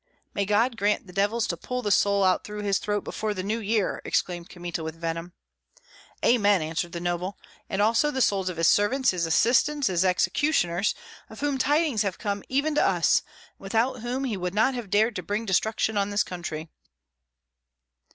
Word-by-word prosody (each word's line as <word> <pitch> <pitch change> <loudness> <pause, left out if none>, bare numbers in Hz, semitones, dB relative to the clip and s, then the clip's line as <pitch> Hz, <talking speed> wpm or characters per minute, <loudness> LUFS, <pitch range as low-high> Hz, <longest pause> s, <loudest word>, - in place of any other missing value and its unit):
"May 200 - 0
God 225 +4 +2
grant 210 0 +1
the 180 - -13
devils 205 +4 +1
to 170 - -2
pull 250 +8 -5
the 205 - 0
soul 200 0 +3
out 185 -1 +2
through 210 0 -6
his 200 -2 +1
throat 205 -1 -2
before 215 -1 -3
the 185 - -3
New 215 +4 -1
Year!" 215 -2 -1
exclaimed 175 -1 -2
Kmita, 175 -2 -5
with 160 0 -5
venom. 165 +1 -4 0.9
"Amen!" 205 -5 +4
answered 165 +2 -3
the 170 - -3
noble, 175 +2 -3 0.3
"and 195 +1 +1
also 230 +7 +3
the 265 - -3
souls 195 -6 +2
of 180 - -6
his 165 -1 +3
servants, 250 +6 +3
his 175 -3 -1
assistants, 255 - +3
his 180 -1 +1
executioners, 185 - +1 0.3
of 220 - -11
whom 285 -2 0
tidings 290 -5 +2
have 195 -3 -1
come 200 -2 -3
even 285 +4 +1
to 300 - +3
us, - - +3
and - - -29 0.3
without 225 +6 0
whom 245 +4 -3
he 235 -7 -2
would 180 +1 -4
not 240 +5 +3
have 240 -5 -6
dared 215 +3 +2
to - - -3
bring 205 +5 -3
destruction 220 +2 0
on 200 0 +1
this 205 +1 +1
country." 165 -3 -6
205 Hz, 190 wpm, -26 LUFS, 180-230 Hz, 0.9 s, Amen